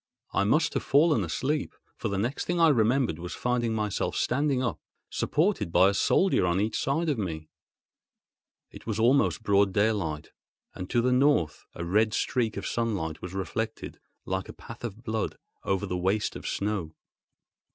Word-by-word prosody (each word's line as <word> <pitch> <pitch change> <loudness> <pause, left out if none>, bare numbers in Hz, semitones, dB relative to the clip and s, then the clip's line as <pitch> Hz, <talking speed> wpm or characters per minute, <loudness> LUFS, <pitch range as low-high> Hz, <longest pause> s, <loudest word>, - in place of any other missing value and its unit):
I 100 - +2
must 150 +10 +2
have - - 0
fallen 150 +2 +3
asleep; 150 +2 -2 0.2
for - - -3
the 100 -2 -2
next 120 +8 -2
thing 175 0 -1
I 165 -1 +6
remembered 120 - +2
was 90 +1 -6
finding 120 -2 0
myself 105 -2 -1
standing 135 0 +1
up, 115 -7 -2 0.3
supported 165 - 0
by 95 +3 +5
a - - 0
soldier 185 - +3
on 90 +1 +1
each 105 +2 -1
side 160 +5 0
of 145 -7 0
me. 80 -5 -4 1.2
It - - -13
was 110 -1 -2
almost 120 0 +3
broad 100 -2 +3
daylight, 100 -8 0 0.4
and 90 - -7
to 120 -1 +2
the 125 - +2
north 125 - +2
a 85 - -4
red 110 +5 +2
streak 115 -5 0
of 100 - -4
sunlight 100 -10 -2
was 90 +1 -7
reflected, 110 +4 -4 0.3
like 95 0 -3
a - - -7
path 115 +1 -11
of 115 0 -6
blood, 110 -2 -2 0.3
over 95 -2 0
the 90 - -3
waste 95 +4 0
of - - -6
snow. 100 -6 -2
110 Hz, 170 wpm, -27 LUFS, 95-125 Hz, 1.2 s, I